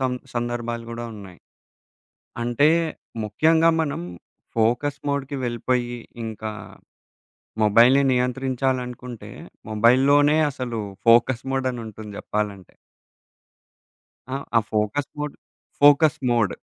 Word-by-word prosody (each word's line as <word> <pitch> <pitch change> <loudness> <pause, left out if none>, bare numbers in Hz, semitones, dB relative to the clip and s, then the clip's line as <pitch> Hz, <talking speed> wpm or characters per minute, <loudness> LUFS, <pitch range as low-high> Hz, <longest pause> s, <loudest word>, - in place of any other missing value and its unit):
సం 130 -1 0 0.2
సందర్భాలు 120 -1 -3
గూడా 120 0 -5
ఉన్నాయి. 95 -4 -12 1.0
అంటే 120 +5 +3 0.6
ముఖ్యంగా 160 +10 +3
మనం 150 - -2 0.6
ఫోకస్ 120 +6 +1
మోడ్‌కి 140 0 -2
వెళ్ళిపోయి 120 0 -1 0.3
ఇంకా 110 -1 -5 1.1
మొబైల్‌ని 120 +6 +5
నియంత్రించాలనుకుంటే 125 -1 -2 0.4
మొబైల్‌‌లోనే 135 +7 +4
అసలు 125 -4 -4 0.3
ఫోకస్ 120 +2 +5
మోడ్ 135 -1 0
అనుంటుంది 110 -3 -8
జెప్పాలంటే. 105 -3 -4 1.6
ఆ! 135 - -1 0.2
ఆ - - +8
ఫోకస్ 110 +6 -1
మోడ్ 150 -1 -3 0.5
ఫోకస్ 145 +1 +6
మోడ్. 115 -6 +2
120 Hz, 90 wpm, -23 LUFS, 115-135 Hz, 1.6 s, ఆ